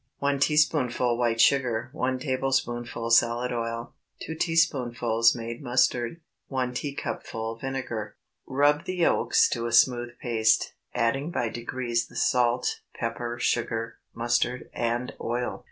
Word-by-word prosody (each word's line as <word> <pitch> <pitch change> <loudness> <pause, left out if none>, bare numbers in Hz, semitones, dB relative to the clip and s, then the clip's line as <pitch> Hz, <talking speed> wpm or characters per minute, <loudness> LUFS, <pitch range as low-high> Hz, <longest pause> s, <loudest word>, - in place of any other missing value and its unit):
1 140 0 0
teaspoonful 140 -5 +2
white 115 -1 0
sugar. 125 -3 +3
1 130 -3 -1
tablespoonful 120 -4 -1
salad 120 +1 +3
oil. 115 0 -4 0.3
2 160 - -4
teaspoonfuls 125 -9 +2
made 115 +1 -6
mustard. 125 +2 +1 0.3
1 130 -2 -2
teacupful 115 -4 -4
vinegar. 120 -5 -4 0.3
Rub 145 +3 +2
the 185 - -3
yolks 175 -2 +3
to 120 -1 -2
a - - -4
smooth 120 0 +3
paste, 110 -2 +2 0.2
adding 125 +6 +1
by 120 -9 -1
degrees 120 0 -2
the - - -17
salt, 125 0 +1 0.2
pepper, 120 0 -3
sugar, 115 -1 -1 0.2
mustard, 120 +2 0
and 120 +1 -1
oil. 120 +1 -2
120 Hz, 120 wpm, -27 LUFS, 115-130 Hz, 0.3 s, sugar